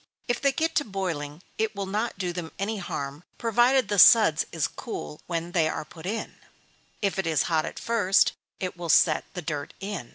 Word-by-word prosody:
If 245 - -1
they 275 - +3
get 320 +4 -1
to 290 - +3
boiling, 175 - -4 0.2
it 220 -1 0
will 200 0 -3
not 215 +4 -2
do 180 -3 -2
them 170 -2 -5
any 210 +3 -2
harm, 145 -4 -5
provided 240 +3 +3
the 205 -2 0
suds 215 -11 +7
is 160 -4 0
cool 75 0 -7
when 170 0 -3
they 165 -3 +2
are 155 - -4
put 165 +2 -10
in; 220 +3 -4 0.7
if 195 -1 0
it 190 - -1
is 155 -4 +2
hot 160 -2 +1
at - - -7
first, 210 -5 +3 0.3
it 185 -1 -3
will 175 -1 -6
set 155 0 +4
the 180 - -4
dirt 150 -1 -4
in. 195 - -5
185 Hz, 200 wpm, -26 LUFS, 160-215 Hz, 0.7 s, suds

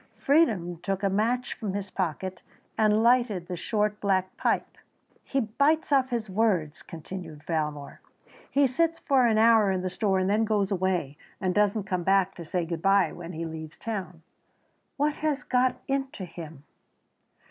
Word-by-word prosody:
Freedom 215 - +2
took 195 +1 -2
a 195 - +2
match 235 +5 0
from 205 -4 -4
his 200 -1 -4
pocket 185 +1 -3 0.3
and 215 0 +3
lighted 235 -7 +3
the 180 - -5
short 210 +3 -1
black 190 -2 0
pipe. - - -1 0.4
"He 275 - -1
bites 280 +9 +1
off 265 -2 +3
his 235 -3 -2
words," 185 -7 0
continued 165 -2 -9
Valmore; 150 -3 -3 0.5
"he 280 0 +3
sits 330 +6 +1
for 265 -5 +3
an 220 -2 +2
hour 220 -2 +5
in 190 -1 0
the 185 - -2
store 195 0 +1
and 185 0 +1
then 210 +3 +2
goes 210 -2 0
away, 180 -7 -1 0.2
and 185 -1 0
doesn't 210 +1 +2
come 185 -2 -2
back 195 +1 +2
to 170 - -9
say 175 +2 -1
good 165 -1 -4
bye 195 -3 +3
when 175 0 -8
he 165 +1 -4
leaves 160 -1 -8
town. 185 -7 -5 0.7
What 295 +2 +1
has 305 -2 -1
got 250 0 +1
into 270 -7 -2
him?" 160 -4 -10
195 Hz, 170 wpm, -27 LUFS, 180-230 Hz, 0.7 s, hour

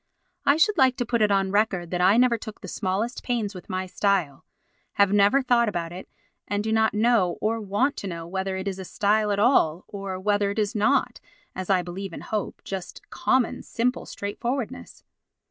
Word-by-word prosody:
I 280 - +5
should 410 +3 +3
like 260 -1 +4
to 245 - -1
put 235 -1 0
it 210 - +4
on 195 -1 +1
record 195 -5 0
that 180 -1 -1
I 190 +5 +5
never 245 -1 +4
took 220 -1 -9
the 195 - -8
smallest 205 +6 -2
pains 230 -4 -2
with 180 - -11
my 185 0 -2
style, 185 -7 0 0.5
have 200 -1 +3
never 205 +7 +4
thought 235 -3 +3
about 170 -4 -3
it, 180 +2 -9 0.4
and 205 0 -1
do 220 - -2
not 220 -1 +2
know 215 -5 +2
or 225 +1 -1
want 210 +8 0
to 200 - -5
know 170 -2 -5
whether 190 +2 -3
it 190 +1 -4
is 190 -1 -3
a - - -5
style 210 +3 +1
at 200 - 0
all 190 - +3
or 195 -2 -5
whether 205 +1 +1
it 200 - -4
is 210 -2 0
not, 220 +7 +1 0.4
as 185 0 -5
I 185 -2 +3
believe 185 +1 -6
and - - -8
hope, 215 -2 -4
just 190 -2 -7
common, 255 -2 +1
simple 250 +2 -2
straightforwardness. 225 - -5
205 Hz, 200 wpm, -25 LUFS, 190-230 Hz, 0.5 s, I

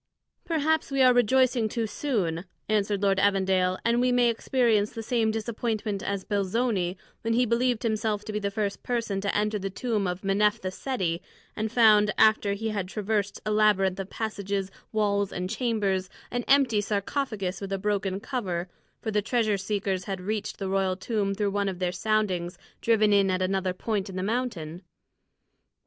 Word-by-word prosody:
"Perhaps 315 -1 +1
we 275 -1 +2
are 255 -1 +7
rejoicing 245 -1 +3
too 230 +1 -1
soon," 195 - -2 0.2
answered 205 -1 0
Lord 195 -1 +3
Evandale, 190 -2 +2
"and 235 +1 +3
we 250 0 +3
may 245 -1 +4
experience 225 -3 +1
the 225 -1 -5
same 225 -1 +1
disappointment 220 -2 -2
as 200 -1 -3
Belzoni, 200 -2 0 0.2
when 225 0 0
he 250 +1 +3
believed 235 0 +1
himself 215 -2 -1
to 215 - -5
be 210 - -1
the 200 -1 -1
first 200 -1 -2
to 205 -5 -1
enter 210 0 0
the 195 0 -3
tomb 210 -1 -1
of 180 +2 -4
Menephtha 200 0 +1
Seti, 185 -8 -2 0.3
and 220 0 -2
found, 215 -3 +6
after 215 -2 +4
he 220 +2 -3
had 200 -4 -2
traversed 205 0 -2
a 215 - 0
labyrinth 200 -3 +3
of 195 0 -5
passages, 200 -3 -3 0.2
walls, 200 -2 +1
and 180 +1 -3
chambers, 210 -6 0 0.2
an 245 0 -1
empty 265 -6 +4
sarcophagus 205 -2 -2
with 195 -1 -5
a 195 - 0
broken 195 -1 -1
cover; 190 -8 -3 0.3
for 220 - -2
the 210 0 +2
treasure 215 -1 +1
seekers 195 -2 -2
had 195 -2 -3
reached 210 +3 -3
the 195 - -3
royal 190 -1 +1
tomb 200 -1 -1
through 205 0 0
one 200 0 0
of 185 - -5
their 180 -1 -1
soundings 185 -3 -1 0.2
driven 215 -2 +3
in 200 -1 +4
at 185 0 +1
another 190 0 0
point 200 +1 -2
in 190 - -8
the 185 - -2
mountain." 195 -8 -3
205 Hz, 175 wpm, -27 LUFS, 195-225 Hz, 0.3 s, are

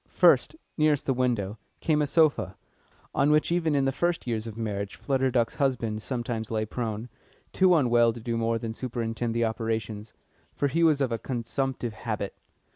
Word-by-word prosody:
First - - +4 0.2
nearest 150 -2 +3
the 135 - +2
window 115 -5 -1 0.2
came 155 -2 +2
a 150 - +1
sofa, 140 - +2 0.6
on 140 +2 +3
which 150 +2 +3
even 165 -3 +1
in 140 -1 +2
the 135 - +2
first 175 +5 -1
years 115 -2 -2
of 110 -1 -8
marriage 100 -3 -3
Flutter 135 -1 0
Duck's 120 -2 +1
husband 115 -5 0
sometimes 120 -3 -3
lay 110 -1 -1
prone, 110 0 -4 0.5
too 185 -1 +5
unwell 120 -5 +4
to 120 - -8
do 115 +1 -3
more 115 0 +1
than 115 0 -4
superintend 115 -1 -3
the 115 0 +2
operations, 110 -1 -3 0.4
for 145 - +1
he 165 +5 0
was 155 -4 +4
of 130 -3 +1
a 115 - -1
consumptive 125 0 -3
habit. 105 -2 -4
120 Hz, 180 wpm, -27 LUFS, 110-140 Hz, 0.6 s, too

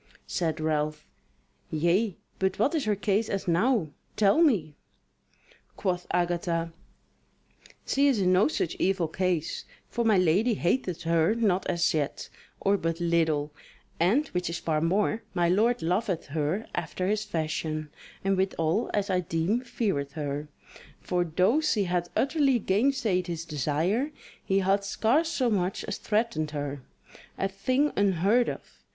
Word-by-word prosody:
Said 160 -4 -2
Ralph: 155 -1 -1 0.6
"Yea, 175 +6 +1 0.2
but 190 0 0
what 245 +9 +2
is 310 -6 0
her 210 -1 +2
case 205 +2 0
as 195 -2 -3
now? 180 - +2 0.3
tell 210 +9 +4
me." 200 - +3 1.0
Quoth 180 -2 -2
Agatha: 170 -1 -1 1.1
"She 280 +1 +3
is 265 -6 +2
in 185 -1 +3
no 185 +3 +5
such 180 - -1
evil 185 -3 +1
case; 175 -1 -1 0.3
for 235 - -1
my 220 -3 +4
lady 185 +7 +3
hateth 180 -3 -1
her 165 +4 +2
not 200 -5 +1
as 170 -1 +1
yet, 150 -3 -2 0.3
or 200 +1 +2
but 165 0 -2
little; 160 -4 +1 0.5
and, 220 - +3
which 180 -1 -2
is 170 - -3
far 155 -2 -1
more, 205 +6 +1
my 175 -1 +2
lord 225 +6 +2
loveth 180 +1 0
her 160 +7 -1
after 175 +1 -3
his 210 +1 0
fashion, 155 -4 -3 0.3
and 195 0 +1
withal 190 +1 0
as 200 -1 0
I 185 - +2
deem 170 +7 0
feareth 195 - -2
her; 145 -1 -4 0.5
for 180 -1 0
though 185 - +2
she 240 -10 +1
hath 175 -1 -1
utterly 280 -2 +2
gainsaid 205 -3 +1
his 165 -1 -4
desire, 165 - 0 0.3
he 195 - +1
hath 195 +1 +2
scarce 250 +11 +1
so 255 -7 0
much 185 -2 0
as - - -4
threatened 210 -8 0
her. 145 -1 -4 0.6
A 195 - 0
thing 255 +10 0
unheard 200 +5 +3
of. - - -9
185 Hz, 145 wpm, -27 LUFS, 165-215 Hz, 1.1 s, no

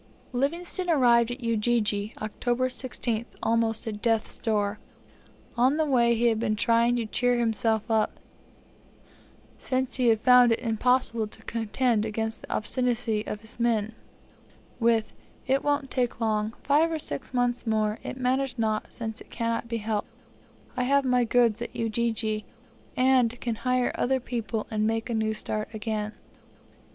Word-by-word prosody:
Livingstone 340 +7 -1
arrived 240 -6 +4
at 245 +1 -6
Ujiji, 215 -2 +1
October 240 +4 -1
16th, 240 -2 -3 0.2
almost 225 -1 +1
at 210 -2 -5
death's 225 -2 0
door. 210 -2 0 0.8
On 255 +5 +3
the 315 - +2
way 240 -4 +3
he 235 +1 0
had 225 -2 +3
been 220 -2 0
trying 230 +2 +3
to 235 -2 -1
cheer 245 +3 +1
himself 225 -2 +1
up, 220 -1 +1 1.4
since 260 0 -1
he 250 -2 +2
had 225 -2 +4
found 250 -1 +6
it - - 0
impossible 230 -1 +1
to 220 +1 -15
contend 230 0 0
against 220 +1 -3
the - - -10
obstinacy 235 -2 0
of 210 - -4
his 225 +2 -7
men, 225 -2 +1 0.9
with, 230 -2 +2 0.3
"It 270 +1 +1
won't 290 -2 0
take 245 -3 -1
long; 220 -1 0
five 305 +4 +3
or 320 - -1
six 275 -3 -6
months 245 -1 0
more; 215 -1 +1
it - - -6
matters 260 0 0
not 220 -2 -1
since 225 -1 -5
it - - -14
cannot 230 0 -2
be 230 0 -2
helped. 215 -1 -2 0.7
I 255 - -1
have 280 +3 +3
got 255 - 0
my 250 -1 +3
goods 235 -1 +2
in 235 - -3
Ujiji, 225 -2 -1 0.5
and 255 -2 +3
can 235 - -2
hire 250 +2 0
other 265 +1 +1
people, 230 -3 -3
and 215 0 +1
make 225 +2 -1
a - - 0
new 220 -1 0
start 215 0 -2
again." 215 -1 -3
235 Hz, 160 wpm, -27 LUFS, 220-250 Hz, 1.4 s, found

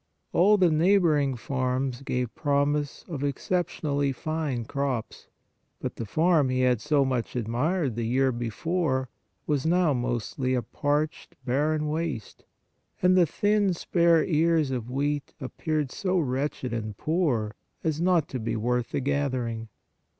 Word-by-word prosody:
All 205 +4 +5
the 180 -4 +4
neighboring 155 -5 +3
farms 130 +1 -2
gave 125 -3 -2
prom 145 +1 +1
ise 145 -1 -4
of 150 -5 -4
exceptionally 145 -1 -1
fine 145 -3 -3
crops, 135 -3 -3 0.5
but - - -5
the 115 - -4
farm 155 - +3
he 130 0 +1
had 125 -3 +2
so 150 -2 +2
much 130 -3 -2
admired 125 - 0
the 115 -1 -2
year 130 +2 +2
before, 130 +3 -1 0.4
was 145 -3 0
now 170 -2 +3
mostly 125 +1 -1
a 125 - 0
parched, 145 +6 -2
barren 150 +4 +1
waste, 155 -7 -4 0.6
and 180 0 +5
the 180 -2 +5
thin 205 -1 +2
spare 170 -1 +3
ears 160 -3 +2
of 120 -2 -3
wheat 145 +2 -2
appeared 150 +1 -2
so 185 -1 -1
wretched 135 -4 -1
and 110 -3 -4
poor 145 -11 0 0.3
as 160 -1 -1
not 175 -4 +3
to 130 - -4
be 115 +1 -2
worth 120 +2 0
the - - 0
gathering. 125 -5 -1
140 Hz, 145 wpm, -27 LUFS, 125-160 Hz, 0.6 s, All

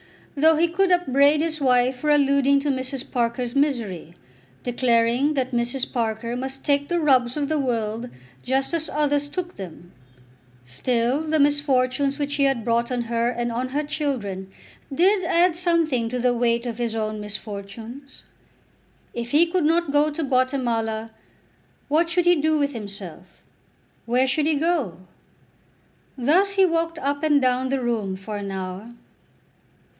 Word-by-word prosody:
Though 315 +3 +5
he 330 +2 +3
could 365 +3 +1
upbraid 295 -4 +3
his 315 -2 -2
wife 250 -1 +2
for 300 +4 -2
alluding 280 -1 +3
to 290 0 0
Mrs. 260 +1 -4
Parker's 240 0 -1
misery, 230 - -1 0.5
declaring 245 +3 +1
that 260 -1 -1
Mrs. 245 +2 -1
Parker 230 0 -2
must 265 +2 -5
take 285 0 +1
the 345 0 0
rubs 260 -4 +2
of 290 -1 -1
the 310 -1 0
world 230 -2 -2 0.3
just 270 - -1
as 325 -1 -1
others 290 -1 0
took 355 +4 -5
them, 175 -2 -10 0.7
still 235 - 0
the 315 0 0
misfortunes 280 -1 +2
which 285 -1 -2
he 280 -1 +2
had 270 -4 0
brought 235 +1 +1
on 245 -1 -1
her 235 0 0
and 240 -1 -2
on 245 +2 -2
her 290 +3 -1
children 260 -11 -3 0.4
did 370 +7 +3
add 345 0 +3
something 330 -9 +1
to 250 - -3
the 245 0 +2
weight 235 0 0
of 235 -1 -5
his 235 -2 -2
own 215 -1 -2
misfortunes. 210 +5 -8 0.9
If 235 0 -5
he 310 +4 +5
could 340 -1 0
not 330 -1 +2
go 295 +1 +3
to 305 +2 -4
Guatemala, 240 -5 0 0.8
what 325 +3 +2
should 350 0 +1
he 350 -1 +5
do 310 +1 +2
with 285 -1 0
himself; 195 -5 -8 0.6
where 250 +2 +2
should 290 +3 +1
he 315 - +2
go? 290 - -1 1.2
Thus 345 +11 +3
he 390 -1 +5
walked 330 -1 -1
up 285 +1 -2
and 300 -2 +3
down 255 0 +1
the 270 -1 -1
room 220 -6 -1
for 205 +2 -6
an 200 -1 -5
hour. 190 +4 -6
260 Hz, 160 wpm, -23 LUFS, 235-300 Hz, 1.2 s, Though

